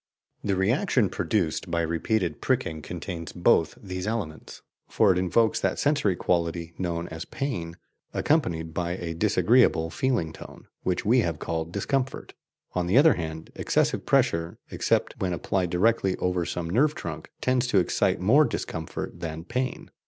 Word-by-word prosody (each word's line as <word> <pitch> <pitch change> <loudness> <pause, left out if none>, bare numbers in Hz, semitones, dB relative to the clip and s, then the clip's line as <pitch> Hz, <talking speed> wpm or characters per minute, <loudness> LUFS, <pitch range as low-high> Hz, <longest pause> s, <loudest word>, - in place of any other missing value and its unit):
The 100 - +1
reaction 115 - +2
produced 85 0 -1
by 85 0 +1
repeated 85 0 -1
pricking 80 -1 0
contains 85 +1 -6
both 85 -2 +3
these 95 -1 -5
elements; 100 -9 -5 0.3
for 105 -3 +4
it 90 - +1
evokes 110 +5 +2
that - - 0
sensory 145 -10 +2
quality 85 -1 -1
known 85 -2 -2
as 80 +1 -6
pain, 85 -12 -4 0.3
accompanied 85 - 0
by 85 +1 -1
a 85 -2 -4
disagreeable 105 -2 +3
feeling 100 -7 0
tone, - - -12 0.2
which 90 -1 -1
we 120 +5 +5
have 85 -8 0
called 80 +1 -3
discomfort. 130 +7 -2 0.4
On 90 -1 -1
the 95 - +3
other 150 +1 +7
hand, 80 -3 -6
excessive - - 0
pressure, 85 0 +2
except - - 0
when 90 -2 0
applied 90 +1 -1
directly 95 +1 +2
over 90 -1 -1
some 85 -1 -3
nerve 135 - +2
trunk, - - -6
tends 125 0 +1
to 115 - +2
excite 90 - +2
more 115 +12 +5
discomfort 80 - -5
than 80 -1 -5
pain." 125 +8 -3
90 Hz, 150 wpm, -26 LUFS, 85-110 Hz, 0.4 s, other